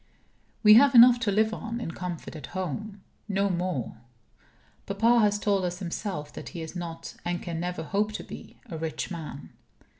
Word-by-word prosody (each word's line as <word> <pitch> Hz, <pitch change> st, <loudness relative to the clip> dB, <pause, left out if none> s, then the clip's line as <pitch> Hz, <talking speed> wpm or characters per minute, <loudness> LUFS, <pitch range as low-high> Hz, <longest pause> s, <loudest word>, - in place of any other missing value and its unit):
We 210 Hz, -1 st, +9 dB
have 270 Hz, +4 st, +7 dB
enough 240 Hz, +1 st, +9 dB
to 225 Hz, -3 st, 0 dB
live 220 Hz, +2 st, +2 dB
on 230 Hz, +2 st, -4 dB
in 230 Hz, -, -4 dB
comfort 175 Hz, -2 st, -6 dB
at 150 Hz, -4 st, -7 dB
home 195 Hz, +3 st, -4 dB, 0.2 s
no 200 Hz, -1 st, +1 dB
more. 175 Hz, -10 st, -2 dB, 0.9 s
Papa 225 Hz, +4 st, +3 dB
has 205 Hz, -2 st, +3 dB
told 200 Hz, -2 st, +1 dB
us 180 Hz, 0 st, -2 dB
himself 180 Hz, -4 st, -4 dB
that -, -, -8 dB
he 165 Hz, -, -4 dB
is 160 Hz, -, -8 dB
not 165 Hz, -2 st, -6 dB
(and 175 Hz, 0 st, -2 dB
can 170 Hz, -3 st, -5 dB
never 175 Hz, -1 st, -3 dB
hope 205 Hz, +5 st, 0 dB
to -, -, -5 dB
be) -, -, -11 dB
a 170 Hz, -9 st, -7 dB
rich 160 Hz, +2 st, -4 dB
man. 160 Hz, -4 st, -7 dB
190 Hz, 180 wpm, -27 LUFS, 170-215 Hz, 0.9 s, We